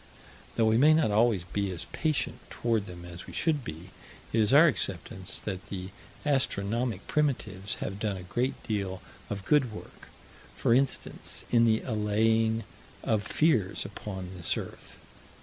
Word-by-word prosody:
Though 115 - +3
we 110 +1 +4
may 155 +3 +7
not 155 -9 +3
always 105 -3 +3
be 100 +3 -2
as 85 -3 -4
patient 150 -5 -1
toward 115 -4 0
them 85 -1 -9
as 85 0 -9
we - - -9
should 155 -4 +1
be, 85 -1 -8 0.4
it 115 - +3
is 105 - +3
our 145 +4 +8
acceptance 95 - 0
that 95 -3 -5
the 95 -1 -5 0.4
astronomic 115 -6 0
primitives 110 -10 0
have 100 - -5
done 105 -3 -1
a 90 - -8
great 120 +9 -2
deal 100 -3 -2 0.3
of 100 -1 -4
good 135 -3 +3
work: 110 - -11 0.5
for - - +2
instance, 135 +2 0
in 115 -1 +5
the 110 -1 +3
allaying 110 0 +2 0.4
of 110 -2 +1
fears 110 - +1
upon 95 -2 -6
this 85 -3 0
earth. - - -8
110 Hz, 155 wpm, -29 LUFS, 95-120 Hz, 0.5 s, our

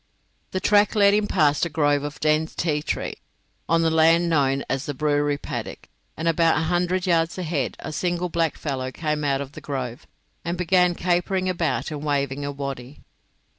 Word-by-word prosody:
The 185 - -2
track 205 +2 +3
led 200 -1 +5
him 210 0 +2
past 150 -7 +2
a 170 - +1
grove 145 -2 +2
of 145 +1 -6
dense 155 +1 +1
ti 150 -3 0
tree, - - -3 0.5
on 165 0 +3
the 165 - +2
land 165 +2 +4
now 145 -5 +3
known 135 +1 -1
as 135 +1 -2
the 145 - -3
Brewery 145 0 +1
Paddock, - - -6 0.3
and 160 - -2
about 165 0 +3
a - - +1
hundred 180 +2 0
yards 165 -1 +1
ahead 155 -8 -2
a 155 - -7
single 175 +2 -1
blackfellow 150 -6 -2
came 150 0 -2
out 140 -1 +1
of 140 -1 -7
the - - -10
grove, 130 -4 -5 0.4
and 170 +1 -3
began 180 0 +3
capering 185 +2 0
about 175 -3 -1
and 150 -1 -5
waving 140 -1 -1
a 145 - -3
waddy. 140 -1 -6
160 Hz, 185 wpm, -24 LUFS, 145-175 Hz, 0.5 s, led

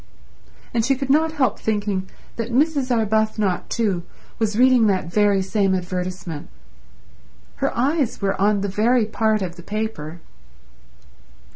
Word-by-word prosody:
And 230 -1 +1
she 270 +4 +2
could 270 0 -2
not 315 +2 +3
help 280 -5 +1
thinking 205 -3 -1 0.3
that 230 +1 -4
Mrs. 280 +1 +2
Arbuthnot, 215 -4 +1
too, 200 -7 0 0.4
was 215 -2 0
reading 250 -2 +5
that 185 -4 -1
very 205 -2 +3
same 195 0 +1
advertisement. 180 -3 -4 1.1
Her - - 0
eyes 275 +1 +1
were 195 -1 0
on 205 0 +3
the 200 - -1
very 220 +4 +2
part 215 -1 +1
of 175 -2 -5
the - - -9
paper. 205 -5 -4
215 Hz, 135 wpm, -22 LUFS, 190-240 Hz, 1.1 s, reading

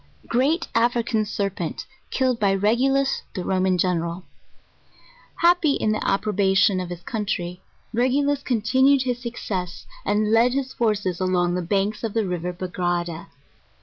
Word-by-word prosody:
'Great 290 +8 +1
African 230 -1 +1
Serpent, 195 -5 -3 0.2
killed 255 -3 0
by 200 -2 +2
Regulus 260 +7 +2
the 185 - -3
Roman 185 -1 +1
Gen 180 -1 +1
eral. 170 +2 -5 1.2
Happy 340 -4 +4
in 215 - 0
the 215 - -1
approbation 195 -1 +2
of 180 -1 -4
his 175 -1 -7
country, 180 -5 -3 0.3
Regulus 275 +4 +1
continu 260 +3 +3
ed 265 - 0
his 245 -1 -2
success, 190 -7 -5 0.2
and 210 +1 +1
led 235 +2 +4
his 270 -1 -2
forces 200 -6 0
along 180 -1 +1
the 180 - -1
banks 200 +5 -1
of 225 -2 -3
the 225 -2 +1
river 180 -1 -3
Bagrada. 175 -2 -3
210 Hz, 145 wpm, -23 LUFS, 180-245 Hz, 1.2 s, Happy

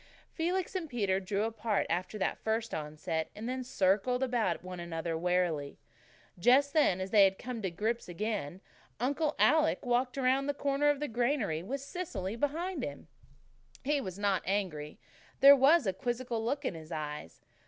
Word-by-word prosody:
Felix 355 +3 -1
and 355 -5 -3
Peter 200 -7 0
drew 195 +2 -1
apart 225 -1 -1
after 180 +5 -2
that 190 - -1
first 225 +1 -2
onset, 155 +1 -3
and 250 +5 -4
circled 215 +3 +1
about 235 -10 0
one 180 -1 -7
another 165 -1 -3
warily. 170 -4 0 0.6
Then, 175 - -18
just 280 +5 +5
as 190 - +2
they 210 -2 +7
had 190 0 +3
come 245 -2 -5
to 190 - -1
grips 215 +5 -2
again, 190 -3 -3 0.4
Uncle 285 +5 0
Alec 310 -2 +3
walked 250 +2 +1
around 270 +1 +2
the 285 - -1
corner 285 +1 +1
of 290 -1 +1
the 295 - -1
granary, 235 - 0
with 260 +10 -4
Cecily 275 - -4
behind 310 +5 -2
him. 145 +2 -7 0.7
He 290 +1 +1
was 185 -6 -6
not 200 -2 +1
angry. 175 -7 -2 0.4
There 280 +1 +10
was 280 +3 +5
a 190 - +1
quizzical 240 +2 -3
look 280 +5 -2
in - - -1
his 160 0 -10
eyes. 150 - -5
225 Hz, 165 wpm, -31 LUFS, 180-275 Hz, 0.7 s, There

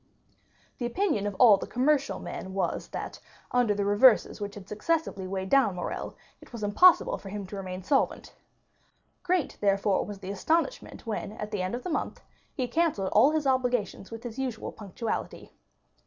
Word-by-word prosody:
The 240 - -1
opinion 240 - 0
of 205 - -4
all 215 -2 +7
the - - -6
commercial 275 +3 +1
men 190 0 -7
was 195 - -1
that, - - -6 0.3
under 245 -4 +2
the 200 0 -1
reverses 210 +2 +4
which 200 0 -5
had 195 -2 -10
successively 210 - -1
weighed 190 0 -4
down 255 -9 +4
Morrel, 180 - -4 0.3
it - - -16
was 235 -3 -7
impossible 270 - +5
for 195 - -9
him 205 0 -5
to 190 - -8
remain 185 -1 -6
solvent. 270 +8 0 0.9
Great, 360 -4 -1
therefore, 200 -1 +2
was 205 -1 -7
the 195 0 -6
astonishment 330 - -1
when 215 -2 -4
at 210 -1 -6
the 205 -3 -2
end 185 +5 -2
of 250 - -6
the 360 - -4
month, - - -2 0.3
he 255 -2 -2
cancelled 290 - 0
all 225 +7 +6
his 310 -1 0
obligations 250 -7 0
with 225 +1 -8
his 240 +1 -7
usual 250 -4 -3
punctuality. 215 +2 -5
215 Hz, 175 wpm, -28 LUFS, 200-265 Hz, 0.9 s, all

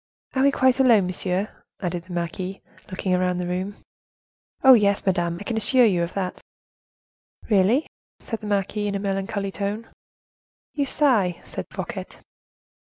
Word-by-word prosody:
"Are 265 - +1
we 280 - +6
quite 260 -1 +2
alone, 235 -7 +5
monsieur?" 185 +2 -2 0.3
asked 175 -2 -3
the - - -11
marquise, 180 +3 -3 0.3
looking 185 0 -2
round 180 0 +1
the 180 - -2
room. 185 +3 -3 0.9
"Oh, 265 -1 +10
yes, 200 -4 +3
madame, 175 -3 0
I - - -7
can 220 +2 -3
assure 245 +3 +5
you 185 -6 +2
of 170 +1 -3
that." 190 -2 -3 1.1
"Really?" 210 +9 +4 0.3
said 225 - -5
the 210 - -6
marquise, 205 +1 -1
in 200 - -3
a - - -1
melancholy 195 0 -2
tone. 205 +3 -4 0.9
"You 285 - 0
sigh!" 225 - +2
said - - -6
Fouquet. - - -5
200 Hz, 155 wpm, -24 LUFS, 180-220 Hz, 1.1 s, Oh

